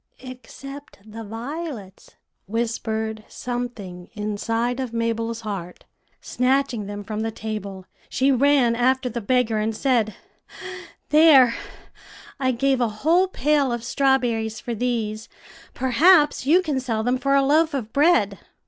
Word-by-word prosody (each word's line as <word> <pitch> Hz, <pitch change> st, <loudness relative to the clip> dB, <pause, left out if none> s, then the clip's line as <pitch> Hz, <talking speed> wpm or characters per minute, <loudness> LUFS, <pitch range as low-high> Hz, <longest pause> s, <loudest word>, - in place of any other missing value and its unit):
"'Except 275 Hz, +3 st, -11 dB
the 220 Hz, +1 st, -9 dB
violets,' 230 Hz, -, -7 dB, 0.3 s
whispered 220 Hz, 0 st, -2 dB
something 240 Hz, -8 st, -6 dB
inside 225 Hz, +4 st, -2 dB
of 255 Hz, -3 st, -4 dB
Mabel's 230 Hz, 0 st, -2 dB
heart. 195 Hz, -5 st, -6 dB, 0.3 s
Snatching 250 Hz, -4 st, 0 dB
them 205 Hz, 0 st, -6 dB
from 210 Hz, +1 st, -5 dB
the 225 Hz, +1 st, -1 dB
table, 210 Hz, -4 st, -6 dB, 0.2 s
she 270 Hz, +1 st, +2 dB
ran 265 Hz, -2 st, +3 dB
after 255 Hz, +2 st, +1 dB
the 235 Hz, 0 st, -4 dB
beggar, 235 Hz, -1 st, +1 dB
and 220 Hz, +1 st, -1 dB
said, 235 Hz, -6 st, +1 dB, 0.9 s
"'There, 295 Hz, -6 st, +7 dB, 0.9 s
I 260 Hz, -2 st, +1 dB
gave 260 Hz, +1 st, +1 dB
a 235 Hz, -, +2 dB
whole 350 Hz, +5 st, +4 dB
pail 295 Hz, -6 st, +1 dB
of 235 Hz, -1 st, -3 dB
strawberries 240 Hz, -4 st, 0 dB
for 240 Hz, -, -5 dB
these; 225 Hz, -2 st, -2 dB, 0.5 s
perhaps 295 Hz, +3 st, +4 dB
you 355 Hz, +5 st, +5 dB
can 295 Hz, -6 st, -1 dB
sell 230 Hz, -4 st, -2 dB
them 250 Hz, +2 st, 0 dB
for 275 Hz, +1 st, +1 dB
a 275 Hz, -, +4 dB
loaf 310 Hz, +2 st, +3 dB
of 230 Hz, -5 st, -5 dB
bread.'" 280 Hz, -, +3 dB
240 Hz, 130 wpm, -23 LUFS, 220-275 Hz, 0.9 s, There